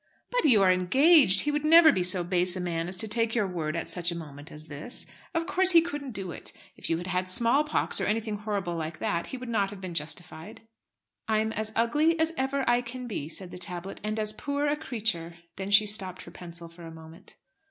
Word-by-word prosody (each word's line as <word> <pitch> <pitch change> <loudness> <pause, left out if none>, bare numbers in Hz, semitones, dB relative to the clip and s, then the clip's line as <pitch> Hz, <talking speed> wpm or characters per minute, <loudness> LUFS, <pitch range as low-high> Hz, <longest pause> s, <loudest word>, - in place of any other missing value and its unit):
"But - - 0
you 225 -9 +5
are 185 - +5
engaged. 250 - +5
He 295 - -1
would 295 0 -2
never 320 +1 +7
be 185 - -1
so 180 0 +3
base 180 +1 +2
a - - -4
man 170 -2 -3
as 180 +1 -4
to 220 - -2
take 230 +1 0
your 215 -4 +2
word 165 -4 -3
at 165 - -3
such 175 -1 0
a - - -5
moment 145 -1 -10
as 150 +1 -9
this. 150 - -5 0.3
Of 330 0 0
course 375 0 +4
he 335 - +8
couldn't 290 -6 -6
do 195 -3 -6
it. - - -8 0.2
If - - -7
you 165 - +1
had 175 - -6
had 185 0 -2
small 235 +9 +3
pox, 300 - +2
or - - 0
anything 215 0 -1
horrible 200 -4 -3
like 160 -1 -5
that, 170 0 -2
he 260 - -6
would 250 0 -8
not 205 -4 0
have 200 -1 -10
been 185 -2 -7
justified." 160 +5 -6 0.7
"I'm 220 0 +1
as 220 0 -3
ugly 300 +9 +2
as 320 +1 +1
ever 270 0 -1
I 240 0 +3
can 250 +1 -7
be," 180 -10 -5
said 180 +1 -6
the 180 - -8
tablet, 180 +1 -5
"and 215 +1 -2
as 215 0 -2
poor 285 +5 -3
a 290 0 +1
creature." 215 - -3 0.2
Then 190 +1 -5
she 205 +1 +5
stopped 195 -3 -2
her - - -12
pencil 170 -1 -8
for 170 +1 -15
a 165 - -9
moment. 160 0 -14
200 Hz, 235 wpm, -27 LUFS, 175-250 Hz, 0.7 s, he